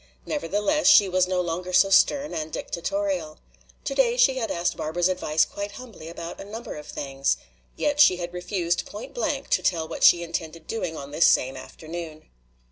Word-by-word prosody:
Nevertheless, 210 Hz, -, 0 dB
she 205 Hz, -, +7 dB
was 185 Hz, 0 st, +2 dB
no 185 Hz, -1 st, 0 dB
longer 180 Hz, +1 st, -4 dB
so 195 Hz, +2 st, +4 dB
stern 285 Hz, +8 st, +3 dB
and 155 Hz, -1 st, -4 dB
dictatorial. 280 Hz, -, -3 dB, 0.5 s
Today 265 Hz, -3 st, +1 dB
she 260 Hz, +1 st, +4 dB
had 225 Hz, -, -2 dB
asked 170 Hz, +1 st, -1 dB
Barbara's 175 Hz, +3 st, 0 dB
advice 160 Hz, -4 st, +1 dB
quite 200 Hz, 0 st, -6 dB
humbly 230 Hz, -11 st, -11 dB
about 170 Hz, 0 st, -7 dB
a -, -, -6 dB
number 225 Hz, +4 st, -7 dB
of 150 Hz, -1 st, -9 dB
things. 135 Hz, -1 st, -1 dB, 0.4 s
Yet 295 Hz, 0 st, -1 dB
she 185 Hz, -11 st, +7 dB
had 175 Hz, 0 st, -5 dB
refused 180 Hz, -1 st, -2 dB
point 210 Hz, +2 st, -9 dB
blank 485 Hz, -, -2 dB
to -, -, +2 dB
tell 165 Hz, -3 st, 0 dB
what 165 Hz, -, -5 dB
she 175 Hz, 0 st, +7 dB
intended 165 Hz, -1 st, -5 dB
doing 180 Hz, -8 st, -4 dB
on 140 Hz, 0 st, -8 dB
this 155 Hz, +3 st, +4 dB
same 130 Hz, +1 st, +2 dB
afternoon. 155 Hz, +4 st, -8 dB
180 Hz, 180 wpm, -25 LUFS, 160-220 Hz, 0.5 s, she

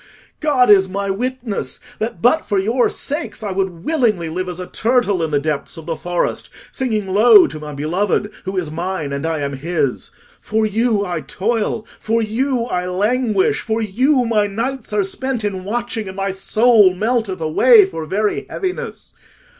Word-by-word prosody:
God 270 Hz, -7 st, +3 dB
is 190 Hz, -2 st, +5 dB
my 200 Hz, +1 st, -2 dB
witness 245 Hz, 0 st, -3 dB, 0.2 s
that 215 Hz, -6 st, -4 dB
but 250 Hz, +7 st, +4 dB
for 205 Hz, -, -1 dB
your 225 Hz, +6 st, +2 dB
sakes 295 Hz, -5 st, -4 dB
I 205 Hz, -, -3 dB
would 185 Hz, -3 st, -3 dB
willingly 225 Hz, -, +1 dB
live 180 Hz, +3 st, -3 dB
as 180 Hz, 0 st, -6 dB
a 180 Hz, -, -4 dB
turtle 225 Hz, -4 st, +1 dB
in 160 Hz, -, 0 dB
the 145 Hz, -, +1 dB
depths 145 Hz, +1 st, -3 dB
of 160 Hz, -, -9 dB
the 165 Hz, 0 st, -2 dB
forest, 175 Hz, +2 st, -2 dB, 0.2 s
singing 220 Hz, -7 st, -2 dB
low 240 Hz, -, +7 dB
to 155 Hz, -, -6 dB
my 150 Hz, -1 st, -7 dB
Beloved, 180 Hz, +7 st, -1 dB
who 190 Hz, 0 st, -3 dB
is 165 Hz, -5 st, -2 dB
mine 170 Hz, -3 st, -3 dB
and 140 Hz, +3 st, -2 dB
I 160 Hz, -2 st, -1 dB
am 140 Hz, 0 st, -2 dB
his. 140 Hz, -1 st, -2 dB, 0.3 s
For 220 Hz, 0 st, 0 dB
you 215 Hz, -1 st, +1 dB
I 175 Hz, -4 st, -3 dB
toil, 215 Hz, +8 st, -2 dB
for 225 Hz, +1 st, 0 dB
you 235 Hz, +3 st, 0 dB
I 180 Hz, -5 st, -2 dB
languish, 210 Hz, +2 st, +1 dB
for 220 Hz, 0 st, -2 dB
you 250 Hz, +6 st, +2 dB
my 215 Hz, -3 st, +2 dB
nights 230 Hz, +5 st, -4 dB
are 210 Hz, -1 st, +1 dB
spent 245 Hz, +4 st, -2 dB
in 190 Hz, -3 st, -3 dB
watching, 230 Hz, 0 st, -3 dB
and 190 Hz, 0 st, -8 dB
my 195 Hz, 0 st, -1 dB
soul 210 Hz, 0 st, +4 dB
melteth 220 Hz, -2 st, -1 dB
away 205 Hz, +8 st, +6 dB
for 165 Hz, -4 st, -6 dB
very 210 Hz, +4 st, -1 dB
heaviness. 370 Hz, -1 st, -5 dB
205 Hz, 180 wpm, -19 LUFS, 180-235 Hz, 0.3 s, low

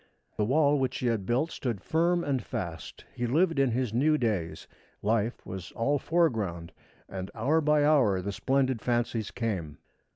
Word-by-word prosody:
The 105 Hz, -, 0 dB
wall 145 Hz, +3 st, +3 dB
which 130 Hz, -1 st, -1 dB
he -, -, -4 dB
had 110 Hz, -5 st, 0 dB
built 135 Hz, +8 st, +1 dB
stood 120 Hz, -8 st, -3 dB
firm 170 Hz, -, +1 dB
and 135 Hz, -3 st, 0 dB
fast. 85 Hz, -6 st, -6 dB
He 120 Hz, -, -2 dB
lived 165 Hz, +4 st, +2 dB
in 135 Hz, -2 st, +3 dB
his 120 Hz, -1 st, -1 dB
new 150 Hz, +6 st, +3 dB
days. 105 Hz, -, -2 dB, 0.4 s
Life 110 Hz, +2 st, 0 dB
was 95 Hz, -1 st, -7 dB
all 140 Hz, +5 st, +1 dB
foreground, 110 Hz, -, 0 dB, 0.4 s
and 95 Hz, 0 st, -6 dB
hour 140 Hz, +9 st, +2 dB
by 150 Hz, -1 st, +3 dB
hour 130 Hz, -11 st, +4 dB
the 100 Hz, +2 st, -3 dB
splendid 130 Hz, +4 st, 0 dB
fancies 120 Hz, -3 st, -1 dB
came. 95 Hz, -11 st, -3 dB
120 Hz, 165 wpm, -28 LUFS, 100-145 Hz, 0.4 s, hour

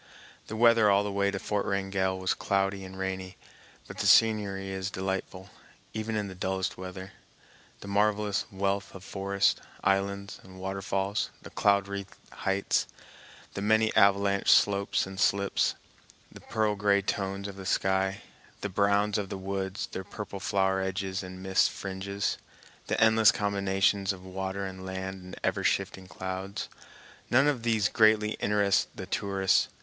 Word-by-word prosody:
The 110 Hz, -, -5 dB
weather 115 Hz, -2 st, +5 dB
all 100 Hz, 0 st, +4 dB
the 105 Hz, -, -3 dB
way 100 Hz, 0 st, +1 dB
to 100 Hz, -, -3 dB
Fort 100 Hz, +1 st, -1 dB
Wrangell 95 Hz, -1 st, -1 dB
was 95 Hz, -1 st, 0 dB
cloudy 95 Hz, 0 st, 0 dB
and 95 Hz, 0 st, -9 dB
rainy, 95 Hz, 0 st, -4 dB, 0.5 s
but -, -, -9 dB
the -, -, +1 dB
scenery 100 Hz, -3 st, +4 dB
is 95 Hz, 0 st, -3 dB
delightful 95 Hz, -1 st, -4 dB, 0.4 s
even 110 Hz, 0 st, -3 dB
in 105 Hz, -1 st, -1 dB
the 95 Hz, -, -7 dB
dullest 95 Hz, 0 st, -2 dB
weather. 95 Hz, +1 st, -8 dB, 0.7 s
The -, -, -9 dB
marvelous 105 Hz, 0 st, +1 dB
wealth 100 Hz, 0 st, -2 dB
of 95 Hz, -, -10 dB
forests, 100 Hz, 0 st, +1 dB, 0.3 s
islands, 100 Hz, +1 st, 0 dB
and 95 Hz, 0 st, -14 dB
waterfalls, 95 Hz, +2 st, -2 dB
the -, -, -10 dB
cloud 100 Hz, -1 st, +2 dB
wreathed 100 Hz, 0 st, -6 dB, 0.2 s
heights, 95 Hz, 0 st, 0 dB, 0.7 s
the 100 Hz, -, -4 dB
many 110 Hz, +1 st, +3 dB
avalanche 100 Hz, 0 st, +4 dB
slopes 100 Hz, 0 st, +4 dB
and 95 Hz, 0 st, -8 dB
slips, 100 Hz, -1 st, +2 dB, 0.6 s
the -, -, -13 dB
pearl 110 Hz, -2 st, 0 dB
gray 100 Hz, 0 st, +2 dB
tones 100 Hz, 0 st, -2 dB
of 100 Hz, -, -8 dB
the 95 Hz, -, -8 dB
sky, 95 Hz, +1 st, +1 dB, 0.4 s
the 100 Hz, -, -2 dB
browns 100 Hz, +2 st, +2 dB
of 100 Hz, -2 st, -4 dB
the -, -, -4 dB
woods, 95 Hz, 0 st, -3 dB
their 95 Hz, -, -5 dB
purple 100 Hz, 0 st, -7 dB
flower 95 Hz, -1 st, +1 dB
edges 95 Hz, 0 st, -2 dB
and 95 Hz, 0 st, -9 dB
mist 95 Hz, 0 st, +3 dB
fringes, 100 Hz, +1 st, -3 dB, 0.5 s
the -, -, 0 dB
endless 110 Hz, -1 st, +6 dB
combinations 100 Hz, -1 st, +1 dB
of 95 Hz, -1 st, -9 dB
water 95 Hz, +1 st, -4 dB
and 95 Hz, 0 st, -7 dB
land 95 Hz, 0 st, -5 dB
and 90 Hz, -, -10 dB
ever -, -, 0 dB
shifting 95 Hz, -1 st, -1 dB
clouds—none 95 Hz, -, -3 dB
of 140 Hz, -5 st, +1 dB
these 110 Hz, -3 st, +2 dB
greatly 110 Hz, -1 st, +4 dB
interest 100 Hz, -1 st, +2 dB
the -, -, -5 dB
tourists. 95 Hz, 0 st, +1 dB
100 Hz, 155 wpm, -29 LUFS, 95-100 Hz, 0.7 s, endless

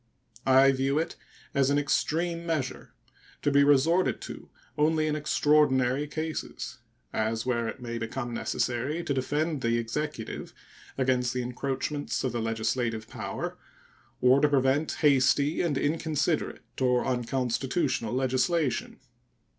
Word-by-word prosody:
I 135 Hz, +1 st, +7 dB
view 135 Hz, +2 st, 0 dB
it 160 Hz, -, -1 dB, 0.4 s
as 140 Hz, -2 st, +3 dB
an 145 Hz, -, +3 dB
extreme 165 Hz, +4 st, 0 dB
measure, 155 Hz, -6 st, -3 dB, 0.5 s
to 145 Hz, -, +2 dB
be 140 Hz, 0 st, +5 dB
resorted 145 Hz, +6 st, +3 dB
to -, -, -8 dB, 0.3 s
only 155 Hz, +1 st, +2 dB
in 155 Hz, -1 st, 0 dB
extraordinary 145 Hz, -2 st, +2 dB
cases, 155 Hz, +1 st, -5 dB, 0.3 s
as 110 Hz, +1 st, -1 dB
where 120 Hz, -2 st, 0 dB
it 120 Hz, +4 st, -6 dB
may 115 Hz, -1 st, -4 dB
become 120 Hz, +2 st, -4 dB
necessary 130 Hz, +7 st, -1 dB
to 140 Hz, -, -1 dB
defend 145 Hz, +3 st, -1 dB
the 115 Hz, 0 st, +1 dB
executive 120 Hz, +1 st, -4 dB, 0.4 s
against 125 Hz, -2 st, +1 dB
the 125 Hz, -, 0 dB
encroachments 135 Hz, +3 st, -3 dB
of 130 Hz, -, 0 dB
the 120 Hz, 0 st, -2 dB
legislative 115 Hz, 0 st, -1 dB
power -, -, -5 dB, 0.6 s
or 130 Hz, +2 st, +5 dB
to 150 Hz, -, +4 dB
prevent 140 Hz, +2 st, +2 dB
hasty 140 Hz, +2 st, +4 dB
and 160 Hz, -6 st, 0 dB
inconsiderate 155 Hz, +1 st, -1 dB, 0.2 s
or 125 Hz, -1 st, +2 dB
unconstitutional 130 Hz, 0 st, -1 dB
legislation. 130 Hz, +3 st, 0 dB
135 Hz, 125 wpm, -28 LUFS, 125-150 Hz, 0.6 s, I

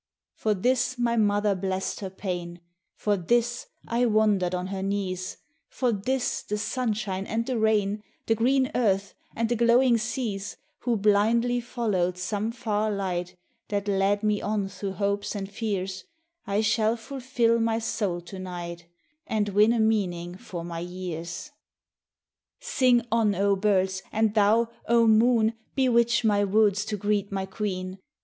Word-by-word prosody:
For 215 Hz, -1 st, 0 dB
this 250 Hz, +5 st, +1 dB
my 235 Hz, -1 st, +1 dB
mother 205 Hz, -2 st, +2 dB
blessed 190 Hz, 0 st, -2 dB
her 195 Hz, -, -5 dB
pain, 175 Hz, -2 st, -5 dB, 0.4 s
For 205 Hz, -1 st, +1 dB
this 240 Hz, +6 st, 0 dB, 0.2 s
I 240 Hz, +1 st, +2 dB
wondered 210 Hz, -5 st, +2 dB
on 180 Hz, 0 st, -3 dB
her 190 Hz, -, -3 dB
knees, 190 Hz, -2 st, -3 dB, 0.3 s
For 250 Hz, -2 st, 0 dB
this 245 Hz, +5 st, -1 dB
the 210 Hz, -, -3 dB
sunshine 210 Hz, -3 st, -2 dB
and 230 Hz, +1 st, -1 dB
the 255 Hz, -2 st, -1 dB
rain, 210 Hz, -1 st, +2 dB, 0.2 s
The 225 Hz, -, +3 dB
green 260 Hz, +4 st, +2 dB
earth 200 Hz, -5 st, +1 dB, 0.2 s
and 230 Hz, 0 st, 0 dB
the 240 Hz, -, 0 dB
glowing 235 Hz, +1 st, +4 dB
seas, 220 Hz, -3 st, -3 dB, 0.2 s
Who 240 Hz, -2 st, 0 dB
blindly 225 Hz, +4 st, +3 dB
followed 205 Hz, -7 st, -1 dB
some 205 Hz, +4 st, -2 dB
far 215 Hz, -2 st, -1 dB
light 180 Hz, -3 st, -2 dB, 0.3 s
That 205 Hz, 0 st, -2 dB
led 200 Hz, +1 st, +1 dB
me 210 Hz, -1 st, +1 dB
on 205 Hz, -2 st, -1 dB
through 195 Hz, 0 st, -5 dB
hopes 200 Hz, +1 st, -1 dB
and 195 Hz, -1 st, -3 dB
fears, 195 Hz, -3 st, -3 dB, 0.4 s
I 200 Hz, +1 st, +1 dB
shall 220 Hz, +1 st, +2 dB
fulfil 240 Hz, -1 st, 0 dB
my 225 Hz, 0 st, +1 dB
soul 205 Hz, -6 st, -2 dB
to 185 Hz, +2 st, -9 dB
night 170 Hz, -2 st, -7 dB, 0.4 s
And 210 Hz, -2 st, 0 dB
win 210 Hz, +3 st, +4 dB
a 235 Hz, -, +1 dB
meaning 180 Hz, -6 st, 0 dB
for 185 Hz, -5 st, -7 dB
my 170 Hz, -1 st, -5 dB
years. 175 Hz, -, -6 dB, 1.1 s
Sing 255 Hz, -, +2 dB
on, 220 Hz, -3 st, +3 dB
oh 200 Hz, +1 st, +2 dB
birds, 190 Hz, -1 st, +1 dB
and 220 Hz, -1 st, +1 dB
thou, 220 Hz, +2 st, +3 dB, 0.2 s
oh 235 Hz, 0 st, +4 dB
moon 225 Hz, 0 st, +4 dB, 0.2 s
Bewitch 235 Hz, -4 st, +3 dB
my 205 Hz, -1 st, +3 dB
woods 205 Hz, 0 st, +3 dB
to 210 Hz, -, -3 dB
greet 205 Hz, 0 st, 0 dB
my 195 Hz, -1 st, -2 dB
queen 190 Hz, -2 st, -4 dB
210 Hz, 150 wpm, -26 LUFS, 190-230 Hz, 1.1 s, glowing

